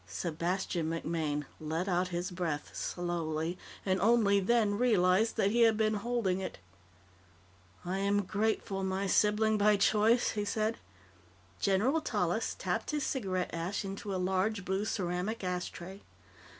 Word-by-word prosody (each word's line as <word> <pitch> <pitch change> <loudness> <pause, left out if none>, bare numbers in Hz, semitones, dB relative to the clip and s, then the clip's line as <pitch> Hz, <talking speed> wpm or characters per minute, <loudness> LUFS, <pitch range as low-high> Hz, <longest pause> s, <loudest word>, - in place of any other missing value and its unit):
Sebastian 170 - -2
MacMaine 160 -3 -2
let 160 +4 -2
out 180 -1 +1
his 175 +1 -3
breath 165 -5 -3
slowly, 170 -1 -2 0.3
and 190 -1 +1
only 210 -2 +4
then 210 0 +2
realized 215 -2 +3
that 200 - +3
he 235 +2 +2
had 225 -2 +5
been 215 0 +2
holding 210 -3 0
it. 190 - -5 1.3
"I 185 +2 -2
am 200 +1 +2
grateful, 200 -1 -1
my 190 +1 -1
sibling 210 +2 +3
by 210 0 +5
choice," 215 +4 +3
he 210 - -2
said. 215 +2 -1 0.8
General 225 +11 +2
Tallis - - -1
tapped - - -2
his 300 -2 -1
cigarette 190 -8 -2
ash 175 +5 -2
into 195 +1 -5
a 190 - -1
large 190 +2 0
blue 190 +3 -1
ceramic 190 +2 -2
ashtray. 180 +1 -4
195 Hz, 135 wpm, -31 LUFS, 180-215 Hz, 1.3 s, had